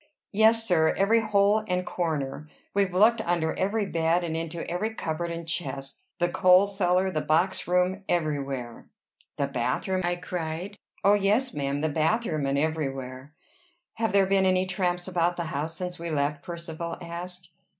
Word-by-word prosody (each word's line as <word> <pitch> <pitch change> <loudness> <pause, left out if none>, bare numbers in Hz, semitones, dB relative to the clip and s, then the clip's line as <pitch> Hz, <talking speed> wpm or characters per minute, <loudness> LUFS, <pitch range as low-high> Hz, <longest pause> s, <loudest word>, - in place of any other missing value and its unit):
"Yes, 225 +2 +4
sir; 160 -3 +3
every 215 +4 +4
hole 210 0 +3
and 180 -1 -1
corner. 155 -3 -3 0.2
We've 195 -2 +2
looked 220 +5 +4
under 170 -3 0
every 205 +2 0
bed, 170 -1 +1
and 165 -2 -2
into 165 +1 -4
every 215 +6 -2
cupboard 170 -1 -3
and 170 0 -6
chest, 135 -5 -4 0.2
the 175 -1 +2
coal 180 +2 +5
cellar, 190 -1 +1
the 155 - -1
boxroom, 180 +3 +1
everywhere." 140 -7 -2 0.5
"The - - +1
bathroom?" 190 -1 -1
I 175 0 0
cried. 175 +2 -5 0.3
"Oh, 200 - +6
yes, 210 +5 +2
ma'am! 140 0 -2
the 160 - +1
bathroom, 155 -1 0
and 135 +1 0
everywhere." 135 -2 -3 0.6
"Have 225 -2 -1
there 195 0 +4
been 190 0 +3
any 185 0 +2
tramps 180 -1 -1
about 175 -1 +1
the 175 - -3
house 155 +3 -3
since 180 -1 -5
we 170 0 -4
left?" 145 -1 -1
Percivale 170 -1 -6
asked. 175 +1 -7
175 Hz, 160 wpm, -27 LUFS, 160-190 Hz, 0.6 s, Oh